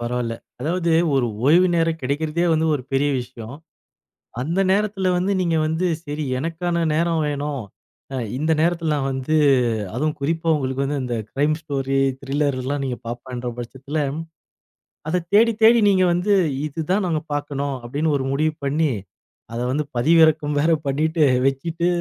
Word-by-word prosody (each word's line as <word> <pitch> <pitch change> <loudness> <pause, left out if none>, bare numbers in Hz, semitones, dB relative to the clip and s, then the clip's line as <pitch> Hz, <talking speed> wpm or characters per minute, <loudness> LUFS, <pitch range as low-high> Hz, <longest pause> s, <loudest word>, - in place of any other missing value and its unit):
பரவால்ல. 120 -1 -2 0.3
அதாவது, 170 +4 0 0.2
ஒரு 130 -3 +2 0.2
ஓய்வு 175 +5 +6
நேரம் 165 -1 0
கெடைக்கறதே 150 +5 -1
வந்து 160 0 +2
ஒரு 140 - -3
பெரிய 140 +2 +2
விஷயம். 120 -1 -9 0.9
அந்த 165 +8 -1
நேரத்துல 200 -1 +1
வந்து 185 +3 0
நீங்க 170 -2 +1
வந்து 160 +3 0 0.2
சரி, 150 0 -4 0.2
எனக்கான 170 +3 -1
நேரம் 165 0 +1
வேணும். 145 -1 -3 0.5
அ. - - -2 0.2
இந்த 155 +3 0
நேரத்துல 165 -1 +1
நான் 135 -2 -1
வந்து 135 +4 -1 0.6
அதுவும் 155 0 -1
குறிப்பா 165 +4 -1
உங்களுக்கு 135 -1 -2
வந்து 140 0 -2
அந்த 125 -1 -3 0.2
க்ரைம் 150 +3 +1
ஸ்டோரி 135 -3 -2 0.2
த்ரில்லர் 140 -1 -1
எல்லாம் 140 +2 -2
நீங்கப் 125 -3 -5
பாப்பன்ற 125 +1 -5
பட்சத்துல 135 +5 -5 1.1
அதைத் 170 +1 -1
தேடித் 225 +1 +4
தேடி 230 +2 +7
நீங்க 190 -2 +4
வந்து 180 +4 +1 0.3
இதுதான் 165 +7 -1
நாம 165 -3 0
பாக்கணும், 145 -1 -2
அப்படின்னு 145 +7 -1
ஒரு 135 - -3
முடிவு 155 +3 +1
பண்ணி 145 +2 +1 0.6
அதை 120 +1 -2
வந்து 150 +3 0
பதிவிறக்கம் 155 +2 +4
வேற 160 +3 +3
பண்ணிட்டு, 155 +4 +1 0.2
வச்சிட்டு 165 +6 -1
150 Hz, 145 wpm, -22 LUFS, 135-165 Hz, 1.1 s, தேடி